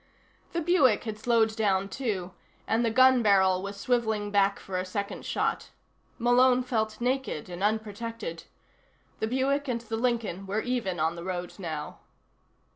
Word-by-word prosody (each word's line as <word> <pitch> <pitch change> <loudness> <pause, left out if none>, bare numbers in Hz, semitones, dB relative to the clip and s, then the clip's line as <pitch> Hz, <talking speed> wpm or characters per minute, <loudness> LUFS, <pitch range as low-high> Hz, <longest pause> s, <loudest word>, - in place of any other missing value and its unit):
The 340 - 0
Buick 305 - +3
had 215 -2 -5
slowed 225 -1 +2
down, 195 -3 +1
too, 195 -6 -3 0.3
and 225 +2 +1
the 230 - +2
gun 255 +2 +5
barrel 190 -3 +4
was 200 +1 -6
swiveling 220 -3 0
back 200 -1 +3
for 185 -1 -4
a - - -1
second 200 +2 -5
shot. - - -1 0.5
Malone 250 +1 +4
felt 220 -3 -1
naked 250 - -2
and 175 +1 -7
unprotected. 215 -4 -3 0.7
The 220 - 0
Buick 275 +4 0
and 235 -2 -1
the 225 -1 -4
Lincoln 225 -6 -1
were 205 +3 -1
even 230 -8 -2
on 160 +2 +1
the 170 - -7
road 180 -1 -4
now. 155 -5 -5
220 Hz, 155 wpm, -28 LUFS, 190-245 Hz, 0.7 s, gun